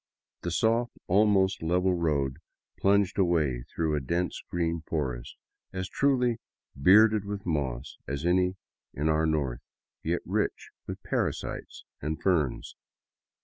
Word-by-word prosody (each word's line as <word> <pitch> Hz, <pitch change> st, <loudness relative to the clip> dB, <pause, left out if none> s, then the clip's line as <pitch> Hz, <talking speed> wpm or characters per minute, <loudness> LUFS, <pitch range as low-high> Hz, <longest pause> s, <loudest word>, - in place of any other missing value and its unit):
The 85 Hz, -, -2 dB
soft, 115 Hz, +7 st, +1 dB
almost 95 Hz, -1 st, +3 dB
level 90 Hz, +3 st, +2 dB
road 70 Hz, -6 st, 0 dB, 0.4 s
plunged 100 Hz, -1 st, +3 dB
away 80 Hz, -9 st, +2 dB
through 80 Hz, -2 st, -1 dB
a -, -, +1 dB
dense 85 Hz, +7 st, -1 dB
green 85 Hz, -1 st, -1 dB
forest, 65 Hz, -6 st, -3 dB, 0.4 s
as 95 Hz, 0 st, -3 dB
truly 125 Hz, -3 st, +2 dB, 0.2 s
" -, -, -51 dB
bearded 110 Hz, +1 st, +7 dB
with 100 Hz, 0 st, -5 dB
moss 70 Hz, -6 st, -2 dB
" -, -, -50 dB
as 70 Hz, +3 st, -3 dB
any 90 Hz, +1 st, +3 dB, 0.4 s
in 75 Hz, +3 st, 0 dB
our 80 Hz, +1 st, +2 dB
North, 70 Hz, -6 st, -1 dB, 0.4 s
yet 85 Hz, +2 st, -1 dB
rich -, -, -1 dB, 0.2 s
with -, -, -6 dB
parasites -, -, -3 dB, 0.2 s
and 75 Hz, +2 st, -3 dB
ferns. 80 Hz, -9 st, 0 dB
85 Hz, 135 wpm, -28 LUFS, 75-95 Hz, 0.4 s, bearded